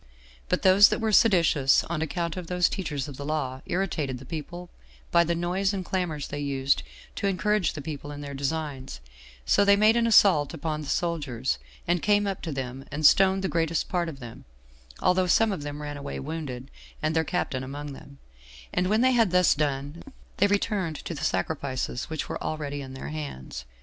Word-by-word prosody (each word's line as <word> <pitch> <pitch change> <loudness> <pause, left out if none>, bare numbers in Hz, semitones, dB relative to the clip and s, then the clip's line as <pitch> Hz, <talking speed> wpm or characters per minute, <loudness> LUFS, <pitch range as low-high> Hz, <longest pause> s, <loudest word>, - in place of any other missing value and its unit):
But - - 0
those 190 +2 +8
that - - -1
were 220 -1 0
seditious 170 - +4
on 165 -2 -3
account 170 +1 -2
of 180 -2 -6
those 180 0 +2
teachers 150 -8 -3
of 140 -3 -9
the 140 - -6
law, 140 -3 -2
irritated 165 -8 -1
the 130 - -12
people 175 +4 -7 0.4
by 170 0 +5
the 170 0 0
noise 185 +4 0
and 190 -2 -4
clamors 170 -7 -2
they 145 - -4
used 140 -1 +1 0.4
to 200 - 0
encourage 200 -1 +1
the 145 - -7
people 145 -1 -6
in 145 0 -7
their 140 -1 -6
designs; 140 - -4 0.5
so 200 - +4
they 200 0 +6
made 215 +2 +5
an 235 -1 +2
assault 175 -9 +5
upon 155 0 -3
the 150 - -7
soldiers, 145 -9 -1 0.3
and 175 0 +1
came 205 0 +3
up 195 -2 -3
to 165 - -4
them, 135 -1 -5
and 150 +2 -2
stoned 190 +3 +5
the - - +1
greatest 165 -2 0
part 175 -2 0
of 140 -4 -9
them, 120 -3 -10 0.6
although 180 0 +3
some 225 +4 +4
of 190 - -3
them 145 0 -6
ran 145 0 -5
away 140 0 -5
wounded, 140 -3 -6 0.3
and 155 +1 0
their 160 - +3
captain 145 -6 -2
among 145 +2 -6
them; 140 +1 -13 0.6
and 180 +1 +1
when 215 +4 +2
they 260 +1 +5
had 230 -5 +4
thus 180 -1 +4
done, 145 +1 -2 0.4
they 200 - +4
returned 200 -5 0
to 170 - -6
the 150 - -6
sacrifices 130 +5 -2
which 160 -1 -3
were - - -5
already 145 -2 -3
in 130 -1 -8
their 135 - -6
hands. 145 - -6
160 Hz, 200 wpm, -26 LUFS, 140-185 Hz, 0.6 s, those